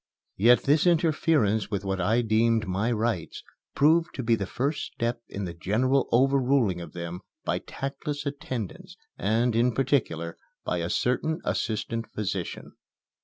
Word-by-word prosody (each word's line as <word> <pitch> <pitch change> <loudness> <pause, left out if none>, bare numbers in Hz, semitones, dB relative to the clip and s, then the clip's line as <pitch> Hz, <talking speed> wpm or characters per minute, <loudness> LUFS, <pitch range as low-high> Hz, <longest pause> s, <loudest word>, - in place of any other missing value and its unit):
Yet 120 +5 +5
this 150 +5 +3
interference 155 - +2
with 100 -1 -3
what 95 -1 -1
I 110 +7 +2
deemed 110 0 +2
my 100 +6 0
rights 110 -6 -2 0.3
proved 160 +4 +3
to 130 - -3
be 115 0 +2
the 100 -4 0
first 140 +8 -1
step 115 0 -2
in 100 -1 -4
the 85 - -5
general 120 +10 +1
overruling 130 -6 +3
of 85 -3 -9
them 85 0 -5 0.3
by - - 0
tactless 145 +2 -5
attendants 140 - -5 0.2
and, 115 +3 +1
in 120 +1 +3
particular, 110 - 0 0.3
by 90 - -1
a 85 0 -2
certain 155 - 0
assistant 115 +1 -2
physician. 100 -4 -4
115 Hz, 145 wpm, -27 LUFS, 100-140 Hz, 0.3 s, Yet